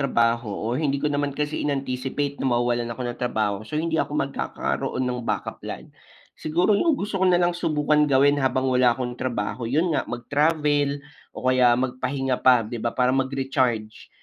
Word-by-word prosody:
trabaho 115 -4 +1
o 110 +3 -3
hindi 140 +1 0
ko 140 - -5
naman 145 -1 -1
kasi 150 0 -2
inanticipate 140 0 -2
na 135 - +1
mawawalan 120 0 0
ako 120 +2 -7
ng 120 - -4
trabaho, 110 -5 -1
so 110 +8 -6
hindi 160 0 0
ako 150 - -3
magkakaroon 135 -1 -2
ng 125 -1 -2
backup 115 - -3
plan. - - -8 0.5
Siguro 175 +6 +2
yung 290 +8 +3
gusto 195 -1 -3
ko 190 - +4
nalang 175 -1 +3
subukan 150 -3 +1
gawin 140 +1 +4
habang 130 0 +1
wala 125 -2 +3
akong 125 -1 -3
trabaho 115 -1 -3
yun 160 +6 +1
nga - - -1
mag-travel 145 +2 0 0.3
o - - -7
kaya 125 -2 +4
magpahinga 130 +1 -2
pa 125 -3 +5
'di 115 +1 -6
ba, 115 - 0
para 125 0 +3
mag-recharge 130 -5 -1
130 Hz, 175 wpm, -24 LUFS, 120-145 Hz, 0.5 s, pa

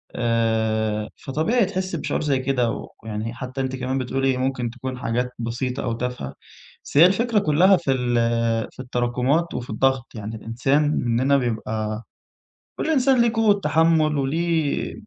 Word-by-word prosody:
آآ 110 -2 0
فطبيعي 190 - 0
تحسّي 185 -2 -3
بشعور - - -2
زي 140 -3 +1
كده 125 -3 -1 0.2
ويعني 110 +1 -4
حتى 130 +2 -5
أنتِ 130 0 -2
كمان 130 +1 -2
بتقول 130 +1 -2
لي 130 -1 +1
ممكن 130 -2 -1
تكون 130 +1 -6
حاجات 125 +1 -1
بسيطة 125 +2 -3
أو 115 - -1
تافهة، 120 - -4 0.5
بس - - -4
هي 165 - +9
الفكرة 220 +3 +2
كلها 185 +3 +4
في 170 -6 -1
ال 125 -2 0 0.6
في - - -22
التراكمات 125 +6 0
وفي 125 - -5
الضغط، 130 +2 0
يعني 110 +1 -6
الإنسان 120 +7 0
منّنا 130 +2 +2
بيبقى، 110 -3 -2 0.7
كل 320 - -2
إنسان 265 -3 +4
ليه 235 -1 +3
قوة 215 -3 +3
تحمُّل 155 -1 +3
وليه 160 +2 0
130 Hz, 150 wpm, -23 LUFS, 120-155 Hz, 0.7 s, هي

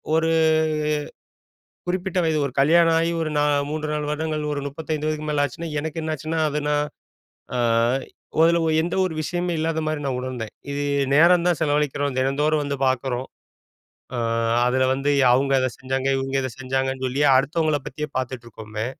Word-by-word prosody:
ஒரு 165 0 +2 1.6
குறிப்பிட்ட 185 +1 -2
வயது 160 -1 +1
ஒரு 130 - -6
கல்யாணம் 165 +3 +5
ஆயி 165 +1 +1
ஒரு 155 -1 -1
நா - - +3 0.3
3.5 150 0 -3 0.2
வருடங்கள், 155 0 -2
ஒரு 145 - -2
35 155 +1 -4
வயதுக்கு 155 0 -2
மேல 145 -1 +2
ஆச்சுனா, 165 +5 -7
எனக்கு 160 +1 -4
என்ன 155 0 -2
ஆச்சுனா, 160 +3 -3
அது 150 +1 -1
நான் 150 0 +2 0.7
அ - - 0 0.9
அதுல 170 +1 +4 0.2
எந்த 170 - -2
ஒரு 170 - -3
விஷயமே 175 +2 -2
இல்லாதமாரி 155 -1 -1
நான் 130 -2 -1
உணர்ந்தேன். 125 -4 -5 0.2
இது 145 0 -2 0.3
நேரம் 170 +3 +5
தான் 175 - +2
செலவழிக்கிறோம். 145 -2 0
தினந்தோறும் 150 +3 +1
வந்து 140 0 -2
பாக்கிறோம். 130 0 -1 0.9
ஆ - - -3 0.5
அதில 130 +1 +2
வந்து, 135 +2 -1 0.2
அவுங்க 135 +2 +2
அத 130 - +1
செஞ்சாங்க, 130 +1 -2
இவுங்க 135 0 -3
இத 130 - -2
செஞ்சாங்கன்னு 130 0 -2
சொல்லி 130 +3 -1 0.2
அடுத்தவங்கள 150 +2 +1
பத்தியே 150 +2 -4
பாத்துட்ருக்கோமே, 115 -4 -5
150 Hz, 150 wpm, -23 LUFS, 130-160 Hz, 1.6 s, கல்யாணம்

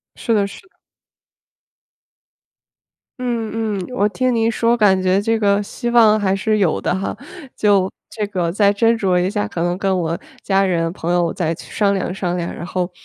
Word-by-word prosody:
是 230 - -1
的 205 -2 +2
是 200 - -11
的。 - - -37 2.4
嗯 225 -4 -2
嗯， - - -6
我 210 -3 +1
听 255 +2 0
您 225 0 +2
说 230 +1 +2
感 200 -5 +3
觉 185 +1 +2
这 225 +2 0
个 200 -1 +2
希 240 +4 -4
望 220 -3 +5
还 195 -2 +1
是 215 +2 0
有 190 -6 +1
的 - - 0
哈！ 190 +1 -3 0.4
就 200 -3 +3 0.2
这 210 -2 -3
个 180 -4 -1
再 200 +2 +3
斟 225 +3 +3
酌 185 -3 +2
一 180 +1 +1
下， 105 - -2
可 165 - -5
能 175 +1 -1
跟 190 -1 0
我 165 -1 -2 0.2
家 195 0 +2
人 165 -3 0
朋 175 0 -3
友 175 -2 +1
再 165 -2 -1
去 - - -13
商 200 -2 +2
量 190 -2 -2
商 180 -2 -2
量， 175 -1 -3
然 170 - -7
后 180 0 -2
195 Hz, 205 characters per minute, -19 LUFS, 180-215 Hz, 2.4 s, 望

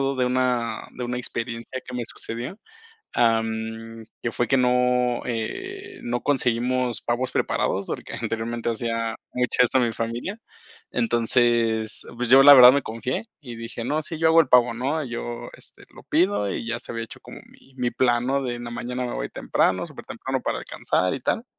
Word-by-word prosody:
todo 135 0 0
de 130 - +2
una 125 -2 0
de 125 - -5
una 125 +1 -2
experiencia 115 +1 -5
que 125 - -8
me 120 -1 -2
sucedió, 120 - -6 0.6
am, 115 0 0 0.2
que 115 - -2
fue 120 - -1
que 135 - +4
no, 125 -1 +2
eh, 115 -2 -5
no 120 0 -2
conseguimos 125 -2 0
pavos 120 +2 -1
preparados, - - 0
porque - - -5
anteriormente 115 +1 -3
hacía 115 -1 -2 0.2
mucho 125 0 +2
esto 125 +1 +3
a - - +4
mi 120 -1 +1
familia. 115 - -4 0.5
Entonces, 115 - +1
pues 125 0 -2
yo 135 +1 +9
la 145 +1 +11
verdad 125 -1 +10
me 140 0 +2
confié, 115 +3 -3 0.2
y 125 -5 -8
dije: 115 0 -6
"No, 150 +5 0
sí, 160 +1 -4
yo 165 - +2
hago 165 +1 +7
el 160 - +2
pavo", 120 -1 +5
¿no?, 140 +6 -1
yo, 120 -1 -5
este, - - -9
lo - - -13
pido 170 - +1
y 115 - -4
ya 115 +1 -2
se - - -2
había 115 0 -3
hecho - - -12
como - - -11
mi 135 - -21
mi 125 -2 0
plan, 120 -1 +2
¿no?, 135 +1 +1
de 125 -2 -2
en 120 - -7
la 120 - -6
mañana 125 +1 -4
me 120 - -4
voy - - -3
temprano, - - 0
supertemprano - - -5
para - - -2
alcanzar 90 0 -1
y 135 - -5
tal. 225 - -1
120 Hz, 190 wpm, -24 LUFS, 115-130 Hz, 0.6 s, la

